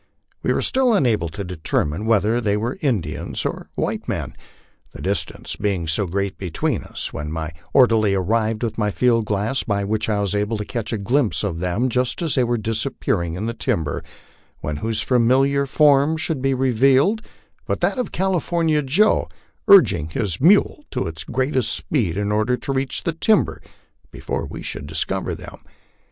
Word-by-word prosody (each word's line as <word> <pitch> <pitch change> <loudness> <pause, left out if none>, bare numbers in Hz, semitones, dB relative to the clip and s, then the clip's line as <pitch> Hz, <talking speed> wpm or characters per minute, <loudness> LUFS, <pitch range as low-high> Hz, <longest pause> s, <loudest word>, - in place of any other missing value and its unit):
We - - 0
were - - +1
still 255 -3 +3
unable 110 - +1
to 100 +5 -6
determine 90 +1 -2
whether 115 +2 +2
they 105 -2 +1
were 120 - -3
Indians 105 - -2
or - - -4
white - - -2
men, - - -3 0.6
the - - -9
distance 95 -2 -3
being 95 -5 -1
so 85 +5 0
great 100 +2 -2
betweeri 90 -4 -2
us, - - -5
when 75 +1 -5
my 80 0 -4 0.2
orderly 110 -6 +4
arrived 110 +4 0
with 115 -1 -2
my 105 -1 +1
field 115 +1 +2
glass, 105 +6 -1
by 100 -2 -1
which 110 +2 -1
I 105 -1 +1
was 100 -1 -1
able 105 +2 0
to 105 - -4
catch 115 -2 -4
a 115 - -1
glimpse 120 +3 +1
of 90 -5 -2
them 90 +8 0
just 125 +5 -1
as 160 - 0
they 130 - +3
were 120 0 0
disappearing 105 -6 -1
in 100 +4 -3
the 115 - -2
timber, 80 -9 -2 0.6
when 75 0 -3
whose 110 +6 -1
familiar 135 +3 +3
form 145 +2 +4
should 160 -4 -2
be 135 0 +1
revealed 135 - +3 0.5
but - - -2
that - - +1
of 250 - -2
California 170 -4 +1
Joe, 160 +11 +2 0.4
urging 90 - +6
his 90 -1 -3
mule 200 - +4
to 130 - -2
its 80 -1 -5
greatest 130 -1 0
speed 105 - -1
in 105 0 -1
order 110 +4 +1
to 135 - -3
reach 135 0 -2
the 170 - -1
timber 215 +7 +2 0.5
before - - -4
we - - -8
should - - -5
discover - - -2
them. - - -11
115 Hz, 175 wpm, -21 LUFS, 100-135 Hz, 0.6 s, urging